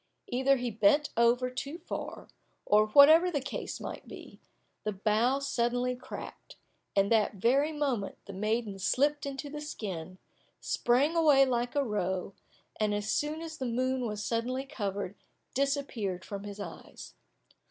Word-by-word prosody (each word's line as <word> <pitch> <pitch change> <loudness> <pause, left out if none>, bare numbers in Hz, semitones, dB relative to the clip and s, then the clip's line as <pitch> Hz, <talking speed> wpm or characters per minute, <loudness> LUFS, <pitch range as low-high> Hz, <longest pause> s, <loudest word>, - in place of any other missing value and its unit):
Either 265 +2 +3
he 245 -1 -2
bent 225 +8 +3
over 240 +2 +3
too 280 +5 -5
far, 350 - -6 0.4
or 210 +1 +4
whatever 310 +9 +7
the 305 -5 -1
cause 275 +1 -5
might - - -7
be, - - -11 0.4
the 215 - -1
bough 215 +6 +2
suddenly 250 -2 0
cracked, 250 +1 -9 0.4
and 200 +1 +3
that 220 -2 +3
very 265 +10 +2
moment 275 -10 -2
the 200 - -8
maiden 215 0 -1
slipped 290 +8 +1
into 275 +1 -5
the 295 +1 -6
skin, 185 - -6 0.4
sprang 270 +7 +2
away 295 -5 +6
like 245 -1 -1
a 285 - +3
roe, 190 -5 -2 0.5
and 210 -1 +1
as 205 +1 0
the 315 0 -5
moon 255 +1 0
was 210 -1 -4
suddenly 250 +3 -1
covered, 205 -8 -4 0.4
disappeared 265 - -1
from 200 0 -6
his 205 0 -8
eyes. 205 - -9
245 Hz, 140 wpm, -30 LUFS, 210-280 Hz, 0.5 s, whatever